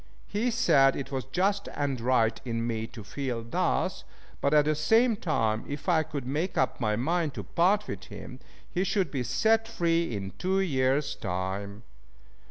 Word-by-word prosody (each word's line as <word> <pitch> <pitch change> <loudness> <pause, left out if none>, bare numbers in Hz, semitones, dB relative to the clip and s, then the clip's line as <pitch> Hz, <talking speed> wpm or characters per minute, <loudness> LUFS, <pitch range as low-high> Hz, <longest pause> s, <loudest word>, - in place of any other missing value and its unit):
He 220 +5 -1
said 180 - +4
it 135 0 -5
was 135 -2 -3
just 195 +8 0
and 140 -4 -1
right 115 -2 +2
in 115 -2 -2
me 115 -1 -2
to 110 - -10
feel 125 +2 -4
thus, 115 - -1 0.4
but 140 - +2
at 150 -1 +5
the 155 - +2
same 225 +10 +3
time, 115 - 0
if 145 +4 -6
I 170 -3 +4
could 150 -4 -5
make 155 +8 -2
up 130 - +1
my 105 -2 +1
mind 155 +5 0
to - - -4
part 200 +5 +2
with - - -6
him, - - -9 0.3
he 180 - -1
should 190 -4 0
be 135 - -2
set 225 - +2
free 170 - 0
in 100 -1 -5
two 190 +1 +1
years' 140 -4 +1
time. 100 +3 -4
145 Hz, 180 wpm, -28 LUFS, 120-180 Hz, 0.4 s, at